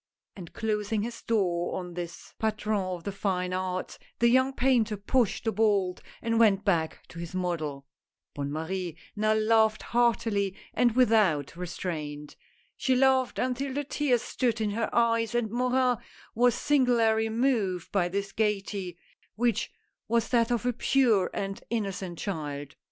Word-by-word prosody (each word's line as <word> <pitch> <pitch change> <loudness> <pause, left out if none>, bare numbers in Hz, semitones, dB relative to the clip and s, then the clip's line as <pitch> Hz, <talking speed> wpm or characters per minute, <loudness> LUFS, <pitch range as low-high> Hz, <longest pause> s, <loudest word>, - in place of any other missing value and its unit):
And 175 -4 -9
closing 210 -1 -1
his 230 0 -6
door 180 -6 0
on 180 -1 -6
this 175 -1 -7
patron 215 -1 0
of 185 -2 -4
the 200 - -3
fine 185 -2 -1
arts, 185 0 -3 0.2
the 235 - +4
young 260 +2 +4
painter 245 -5 +2
pushed 230 +2 +1
the 225 - +1
bolt 200 -4 +1 0.2
and 230 -1 +1
went 205 -3 +4
back 165 -5 0
to 170 - -10
his 170 +1 -6
model. 155 -6 -2 0.5
Bonne 140 0 -4
Marie 170 +2 -3 0.2
now 215 +1 +2
laughed 220 0 +3
heartily 225 -5 +1 0.2
and 240 -2 +2
without 210 - +3
restraint. 155 -4 -5 0.4
She 260 - +1
laughed 260 -1 +3
until 260 +2 -1
the 290 - -1
tears 275 -4 0
stood 235 -3 -1
in 215 -2 0
her 225 +2 -1
eyes, 230 -1 +2
and 230 -3 0
Morin 250 0 +2 0.4
was 245 +1 +3
singularly 230 -6 +2
moved 220 -7 0
by 180 -3 +1
this 200 +2 -3
gayety 195 -4 -2 0.2
— - - -38
which 235 0 0 0.4
was 230 0 +1
that 235 -2 +3
of 240 0 0
a 245 - +2
pure 235 -6 +3
and 195 0 -4
innocent 195 -6 -3
child. 145 -7 -5
215 Hz, 150 wpm, -28 LUFS, 185-235 Hz, 0.5 s, the